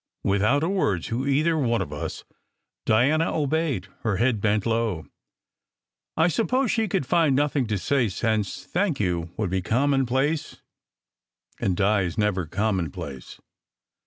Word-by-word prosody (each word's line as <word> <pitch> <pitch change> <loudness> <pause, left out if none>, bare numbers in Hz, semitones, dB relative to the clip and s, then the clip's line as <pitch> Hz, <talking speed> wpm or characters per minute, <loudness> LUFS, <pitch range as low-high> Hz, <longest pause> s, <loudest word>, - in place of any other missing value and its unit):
Without 105 +9 +2
a - - +1
word 175 - 0
to 125 +4 -3
either 155 +2 +2
of 115 - 0
us, 75 - -5 0.6
Diana 145 +9 +3
obeyed, 155 -1 -1
her 110 -4 0
head 120 -2 +1
bent 105 -1 +1
low. 115 -7 0 1.1
I 160 +1 +4
suppose 245 - +1
she 225 -2 +1
could 160 - -1
find 150 0 +3
nothing 145 -2 +1
to 105 -1 -1
say, 135 +4 +1
since 105 +2 -2
"Thank 180 -5 -1
you" 85 -4 -1
would 105 -5 -1
be 95 0 0
commonplace: 135 - 0 1.0
and 95 -3 0
Di 100 +1 +3
is 90 -2 -3
never 100 -5 0
commonplace. 85 - -3
115 Hz, 135 wpm, -25 LUFS, 100-150 Hz, 1.1 s, I